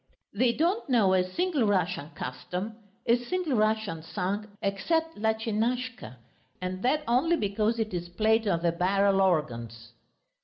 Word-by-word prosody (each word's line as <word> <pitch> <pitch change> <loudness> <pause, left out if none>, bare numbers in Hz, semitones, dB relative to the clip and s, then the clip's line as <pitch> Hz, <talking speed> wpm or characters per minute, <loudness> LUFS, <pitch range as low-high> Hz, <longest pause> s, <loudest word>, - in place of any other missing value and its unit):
They 235 +4 +3
don't 345 - 0
know 215 -7 +4
a 185 -1 +4
single 290 - 0
Russian 180 -6 0
custom, 180 - -5 0.3
a 235 0 +4
single 355 0 -1
Russian 215 -6 +1
song 195 +6 -3
except 320 - 0
"Lutchinushka," 220 - -1 0.4
and 185 +1 -4
that 295 +6 +1
only 270 +9 +3
because 215 0 0
it 220 -3 -2
is 175 -1 -3
played 220 +4 +2
on 170 -3 +1
the 170 - +3
barrel 195 +3 +2
organs. 120 - -1
210 Hz, 140 wpm, -28 LUFS, 180-240 Hz, 0.4 s, know